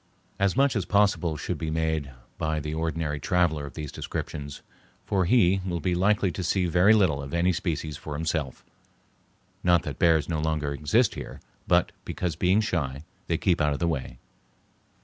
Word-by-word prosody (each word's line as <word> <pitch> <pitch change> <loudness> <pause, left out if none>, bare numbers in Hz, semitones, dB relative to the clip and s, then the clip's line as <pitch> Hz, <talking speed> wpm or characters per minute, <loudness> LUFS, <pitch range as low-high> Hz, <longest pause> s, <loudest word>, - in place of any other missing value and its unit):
As 100 +3 +1
much 140 -1 +3
as 100 -5 0
possible 100 -6 +2
should - - -4
be 80 - -3
made 80 -2 -1 0.3
by 80 0 0
the 75 +1 -4
ordinary 80 -2 -2
traveler 80 -3 +1
of - - -12
these 75 -3 -5
descriptions, 70 -1 -6 0.4
for 95 -2 +1
he 95 -2 +4
will 90 -2 -2
be 90 +3 0
likely 95 +1 +2
to 90 - -5
see 90 +2 +1
very 90 +5 +5
little 90 -9 +2
of 70 +3 -5
any 90 +2 +2
species 80 -4 -3
for 75 -1 -6
himself; 80 -3 -3 1.0
not 85 -2 +4
that - - -6
bears 80 -3 +4
no 80 -3 -1
longer 75 -2 -1
exist 75 - +2
here, - - -8 0.3
but - - +3
because, 90 -4 -3
being 90 +5 +3
shy, 75 -9 -2 0.2
they - - +1
keep 90 -4 +1
out 75 -1 +2
of 70 - -4
the 85 - +1
way. 65 -6 -3
80 Hz, 180 wpm, -26 LUFS, 75-90 Hz, 1.0 s, very